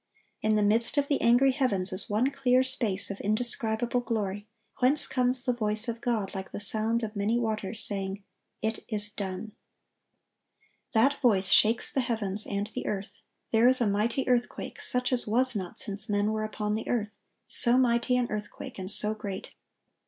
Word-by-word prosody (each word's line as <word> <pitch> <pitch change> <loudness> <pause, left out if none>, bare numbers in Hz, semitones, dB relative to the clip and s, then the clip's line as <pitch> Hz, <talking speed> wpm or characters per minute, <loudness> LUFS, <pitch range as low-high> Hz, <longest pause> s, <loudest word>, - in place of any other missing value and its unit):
In 215 0 +2
the 210 - +2
midst 225 +7 +2
of 285 -1 +2
the 285 - +1
angry 245 +3 +4
heavens 205 -9 0
is 185 +1 0
one 225 +6 +1
clear 260 -2 +2
space 220 -7 0
of 200 - -7
indescribable 230 +2 0
glory, 210 -4 -3 0.3
whence 265 +4 +3
comes 255 0 0
the 250 - +1
voice 215 0 -1
of 230 0 -4
God 220 -5 -2
like 190 -1 -6
the - - -6
sound 220 +3 -1
of 215 0 -5
many 205 +3 0
waters, 220 -2 -1
saying, 195 -1 -1 0.4
"It 220 0 -1
is 210 -2 -2
done."(1093) 200 +1 -5 1.4
That 260 +5 +2
voice 200 -7 +3
shakes 225 +4 +4
the 270 - 0
heavens 215 -4 -1
and 200 0 -2
the - - -5
earth. 200 0 -4 0.3
There 225 +2 +4
is 255 0 +6
a 240 - +2
mighty 215 +6 0
earthquake, 245 -1 -1
"such 250 +1 0
as 245 - +2
was 250 +3 +2
not 185 -4 -5
since 210 +1 -6
men 205 +1 +1
were 215 0 -2
upon 210 -1 -3
the 220 +1 -3
earth, 215 -3 -2 0.3
so 240 +1 +6
mighty 250 0 +2
an 250 - +1
earthquake, 210 -1 -6
and 185 0 -5
so 210 +1 +3
great." 205 -3 -7
220 Hz, 180 wpm, -28 LUFS, 205-245 Hz, 1.4 s, is